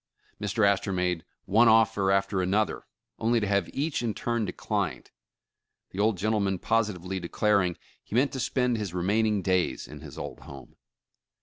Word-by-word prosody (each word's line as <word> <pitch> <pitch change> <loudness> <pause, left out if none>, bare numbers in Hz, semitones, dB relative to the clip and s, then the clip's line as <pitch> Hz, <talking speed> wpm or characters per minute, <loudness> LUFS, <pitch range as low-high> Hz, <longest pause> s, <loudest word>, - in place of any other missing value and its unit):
Mr. 105 +1 +1
Astor 100 0 +1
made 90 -2 -1 0.2
one 110 +5 +5
offer 110 -3 +4
after 95 0 +1
another, 100 +4 0 0.3
only 115 +1 +2
to 105 - -1
have 100 -3 +1
each 145 0 -1
in 115 -3 -2
turn 120 -2 -1
de - - -3
clined, - - -3 0.8
the 95 - -7
old 105 -1 +2
gentleman 100 -1 0
positively 95 -3 -1
declaring 90 0 +1 0.3
he - - -7
meant 135 +4 +3
to 135 - -5
spend 125 -1 +1
his 100 -5 -4
remaining 105 +3 +1
days 95 -2 0
in - - -10
his - - -11
old - - -6
home. 70 -3 -12
100 Hz, 165 wpm, -27 LUFS, 95-110 Hz, 0.8 s, one